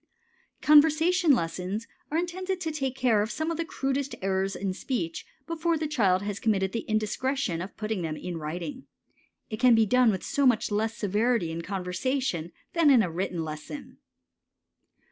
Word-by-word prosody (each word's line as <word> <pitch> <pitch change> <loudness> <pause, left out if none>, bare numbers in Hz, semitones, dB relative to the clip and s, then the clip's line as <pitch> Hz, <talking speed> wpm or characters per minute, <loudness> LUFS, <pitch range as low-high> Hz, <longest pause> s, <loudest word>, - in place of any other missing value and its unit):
Conversation 320 +3 +5
lessons 185 +4 -3 0.2
are 310 - -1
intended 370 +2 -2
to 320 -3 -2
take 270 -4 -2
care 235 -6 +3
of 210 - -1
some 315 +6 -2
of 330 - -3
the 335 - 0
crudest 275 -3 -2
errors 195 0 0
in 190 0 -2
speech 185 -6 -3 0.2
before 335 +1 0
the 310 - -2
child 200 -11 +2
has 205 0 -3
committed 195 -4 +1
the 230 +1 -4
indiscretion 215 -2 -1
of 185 - -8
putting 215 -3 -2
them 155 -2 -3
in 175 -2 -5
writing. 175 - -5 0.6
It 215 - -4
can 250 -2 +6
be 225 -1 +4
done 250 +2 +4
with 190 -4 -1
so 280 -1 +2
much 230 -3 +2
less 220 +2 -1
severity 210 -3 +1
in 165 +1 -4
conversation 185 - -2 0.2
than 330 -3 +4
in 250 -5 +6
a 175 - -2
written 175 -1 -2
lesson. 155 - -8
225 Hz, 170 wpm, -27 LUFS, 190-280 Hz, 0.6 s, can